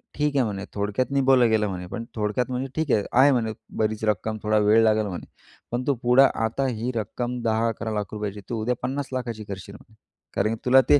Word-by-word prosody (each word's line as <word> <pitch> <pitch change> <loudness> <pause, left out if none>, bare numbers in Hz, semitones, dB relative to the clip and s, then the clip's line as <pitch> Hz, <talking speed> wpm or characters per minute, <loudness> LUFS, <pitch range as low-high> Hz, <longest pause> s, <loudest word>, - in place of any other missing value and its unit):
ठीक 150 -1 0
आहे 135 - +4
म्हणे. 100 -2 -4
थोडक्यात 105 +5 -1
निभवलं 135 -3 +4
गेलं 110 -1 +2
म्हणे, 90 -1 -5
पण 115 +5 -5
थोडक्यात 110 +4 -1
म्हणे 130 +2 -2
ठीक 160 -3 0
आहे, 105 - +3 0.2
आहे 140 +2 +7
म्हणे 115 -4 0 0.2
बरीच 110 0 0
रक्कम. 110 +1 0
थोडा 110 0 +2
वेळ 110 +2 +6
लागेल 110 -1 +3
म्हणे. 90 -3 -6 0.5
पण 120 +1 -1
तू 140 - +3
पुढं 125 +3 +6 0.2
आता 135 +4 -1
ही 120 0 -2
रक्कम 120 +3 -3
₹10-11 115 0 0
लाखांची 105 0 -4
तू 115 -2 -2
उद्या 125 +3 0
50 135 +2 -2
लाखांची 120 -4 -3
करशील 100 0 -8
म्हणे. 110 - -17 0.4
कारण, 110 +3 +1
की 115 - -15
तुला 130 +1 +7
ते 145 - +7
115 Hz, 205 wpm, -25 LUFS, 105-125 Hz, 0.5 s, आहे